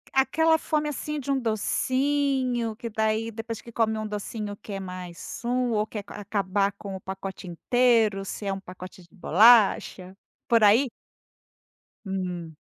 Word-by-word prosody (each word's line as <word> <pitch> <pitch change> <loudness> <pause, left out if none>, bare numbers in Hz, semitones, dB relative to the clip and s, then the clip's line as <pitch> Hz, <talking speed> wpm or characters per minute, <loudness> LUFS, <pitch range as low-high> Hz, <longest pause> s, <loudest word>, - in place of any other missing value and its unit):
Aquela 320 +4 +3
fome 300 -1 -1
assim 300 +2 -4
de 275 +1 -3
um 270 - +1
docinho, 255 +1 0
que 230 - -6
daí 220 +1 -1
depois 225 0 -6
que 235 - -12
come 220 -1 +1
um 215 - -3
docinho 210 0 -5
quer 200 -2 -6
mais 180 -2 -8
um, 245 0 0
ou 215 0 0
quer 210 -2 -6
acabar 200 -1 -1
com 200 -1 -8
o 190 - -8
pacote 190 0 -7
inteiro, 220 +2 +2
se 200 +1 -6
é 195 - 0
um 195 - -5
pacote 185 0 -11
de 170 - -18
bolacha, 200 -1 +4 0.3
por 230 -2 +4
aí? 230 +5 +5 1.1
Hum. 180 -4 -4
215 Hz, 150 wpm, -26 LUFS, 195-245 Hz, 1.1 s, aí